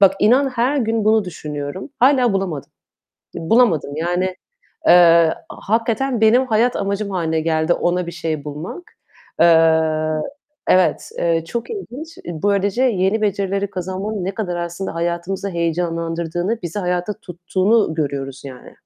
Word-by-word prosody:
Bak 195 Hz, -1 st, +6 dB
inan 255 Hz, +6 st, +4 dB
her 255 Hz, +3 st, 0 dB
gün 225 Hz, -2 st, 0 dB
bunu 220 Hz, -1 st, +4 dB
düşünüyorum. 150 Hz, -, -6 dB
Hâlâ 255 Hz, -3 st, +4 dB
bulamadım. 180 Hz, -8 st, -3 dB, 0.6 s
Bulamadım 165 Hz, -, +2 dB
yani, 175 Hz, +3 st, 0 dB, 0.6 s
eee, 170 Hz, -2 st, +6 dB, 0.2 s
a -, -, -9 dB
hakikaten 230 Hz, +2 st, 0 dB
benim 245 Hz, +4 st, +5 dB
hayat 235 Hz, +2 st, +2 dB
amacım 200 Hz, +1 st, -2 dB
hâline 160 Hz, -3 st, -1 dB
geldi 160 Hz, +1 st, +1 dB
ona 175 Hz, 0 st, 0 dB
bir 170 Hz, -, -6 dB
şey 155 Hz, -3 st, -3 dB
bulmak. 150 Hz, -, -6 dB, 0.6 s
Eee 160 Hz, -2 st, +3 dB, 0.5 s
Evet, 185 Hz, -1 st, +2 dB
eee, 165 Hz, -1 st, +1 dB
çok 235 Hz, -, -5 dB
ilginç. 330 Hz, -, -7 dB
Böylece 200 Hz, +7 st, 0 dB
yeni 210 Hz, -2 st, +1 dB
becerileri 200 Hz, 0 st, -1 dB
kazanmanın 190 Hz, +2 st, -4 dB
ne 195 Hz, +1 st, -3 dB
kadar 180 Hz, -5 st, -3 dB
aslında 175 Hz, +1 st, -4 dB
hayatımızı 175 Hz, +4 st, -2 dB
heyecanlandırdığını, 170 Hz, +3 st, -2 dB
bizi 170 Hz, +3 st, -4 dB
hayatta 180 Hz, +1 st, -1 dB
tuttuğunu 185 Hz, 0 st, 0 dB
görüyoruz 140 Hz, -3 st, -3 dB
yani. 130 Hz, -2 st, -11 dB
180 Hz, 130 wpm, -20 LUFS, 165-215 Hz, 0.6 s, Bak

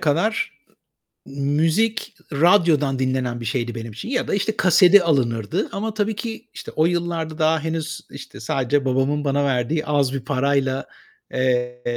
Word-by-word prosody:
kadar 170 Hz, +9 st, 0 dB, 0.7 s
müzik 160 Hz, +11 st, 0 dB, 0.2 s
radyodan 155 Hz, -4 st, +3 dB
dinlenen 130 Hz, -2 st, -1 dB
bir -, -, -6 dB
şeydi 120 Hz, 0 st, -2 dB
benim 115 Hz, -1 st, -6 dB
için 115 Hz, -, -8 dB
ya 250 Hz, 0 st, -1 dB
da -, -, 0 dB
işte 210 Hz, +2 st, -1 dB
kaseti 185 Hz, +1 st, +6 dB
alınırdı 120 Hz, -10 st, 0 dB
ama 215 Hz, +2 st, -3 dB
tabii 215 Hz, 0 st, -1 dB
ki 230 Hz, +2 st, -6 dB
işte -, -, -8 dB
o 155 Hz, -, +4 dB
yıllarda 170 Hz, -2 st, -2 dB
daha 160 Hz, 0 st, +2 dB
henüz, 160 Hz, 0 st, -3 dB
işte, 135 Hz, -7 st, -10 dB
sadece 135 Hz, +4 st, 0 dB
babamın 135 Hz, +3 st, 0 dB
bana 140 Hz, 0 st, +1 dB
verdiği 135 Hz, +3 st, 0 dB
az 140 Hz, -3 st, +1 dB
bir 135 Hz, -, -2 dB
parayla, 135 Hz, -1 st, 0 dB, 0.5 s
eee, 125 Hz, -1 st, 0 dB
145 Hz, 150 wpm, -22 LUFS, 130-170 Hz, 0.7 s, kaseti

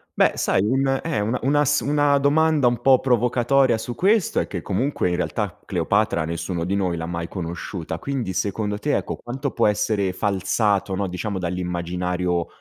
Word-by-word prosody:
Beh -, -, +4 dB
sai 95 Hz, -, +1 dB
un 135 Hz, +3 st, +1 dB
e 165 Hz, -8 st, -1 dB
una 115 Hz, +4 st, -1 dB
una 145 Hz, +2 st, +2 dB
s 145 Hz, +3 st, +3 dB
una 145 Hz, -1 st, +2 dB
domanda 150 Hz, -1 st, +3 dB
un 120 Hz, -1 st, 0 dB
po' 130 Hz, -1 st, +5 dB
provocatoria 125 Hz, 0 st, +2 dB
su 120 Hz, +1 st, -5 dB
questo 200 Hz, -, +2 dB
è -, -, 0 dB
che 90 Hz, -4 st, -5 dB
comunque 105 Hz, -1 st, -1 dB
in 90 Hz, -, 0 dB
realtà 100 Hz, +2 st, -3 dB
Cleopatra 95 Hz, -1 st, +1 dB
nessuno 85 Hz, +1 st, -3 dB
di 95 Hz, -, -1 dB
noi 90 Hz, -3 st, 0 dB
l'ha 80 Hz, 0 st, -4 dB
mai 85 Hz, -1 st, -4 dB
conosciuta, 85 Hz, -1 st, -5 dB
quindi 125 Hz, -2 st, -3 dB
secondo 105 Hz, +2 st, -2 dB
te 145 Hz, +7 st, 0 dB
ecco, -, -, -4 dB
quanto 135 Hz, +3 st, -4 dB
può -, -, +1 dB
essere 100 Hz, -2 st, 0 dB
falsato, 100 Hz, 0 st, 0 dB
no, 95 Hz, 0 st, -1 dB
diciamo 95 Hz, +2 st, -4 dB
dall'immaginario 90 Hz, 0 st, -2 dB
105 Hz, 175 wpm, -23 LUFS, 90-135 Hz, -, po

